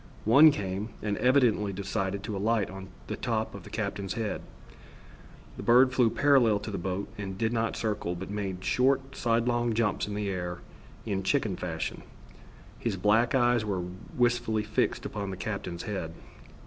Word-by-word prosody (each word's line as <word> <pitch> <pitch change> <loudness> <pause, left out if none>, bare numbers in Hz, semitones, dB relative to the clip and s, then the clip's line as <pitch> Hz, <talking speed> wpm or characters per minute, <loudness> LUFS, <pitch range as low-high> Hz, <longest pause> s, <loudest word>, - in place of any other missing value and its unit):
One 140 +9 +8
came, 100 -3 -3
and 105 -1 0
evidently 125 -6 +3
decided 100 0 -3
to 105 -1 -4
alight 105 0 +1
on 95 0 -8 0.2
the - - -4
top 110 -3 -2
of 100 - -8
the - - -12
captain's 100 -3 -3
head. 110 -3 -2 1.2
The - - -5
bird 125 +2 +5
flew 125 -3 +4
parallel 130 -6 +4
to 105 - -5
the 100 - -3
boat 95 +2 -3
and 95 -2 -5
did 115 +1 0
not 115 -1 0
circle, 105 -5 -2
but 95 +3 -6
made 95 -3 -4
short 135 +1 +2
sidelong 120 0 +1
jumps 115 -3 0
in 105 - -4
the 105 -1 -2
air 90 -2 -3 0.5
in 100 -3 -1
chicken 105 -1 +1
fashion. 80 -3 -4 0.8
His 110 -5 -2
black 110 +6 +3
eyes 120 -3 +3
were 95 -4 -2 0.3
wistfully 120 -3 +2
fixed 110 0 0
upon 100 -2 -4
the 95 - -5
captain's 90 -4 -4
head. 95 -6 -4
105 Hz, 165 wpm, -29 LUFS, 95-120 Hz, 1.2 s, One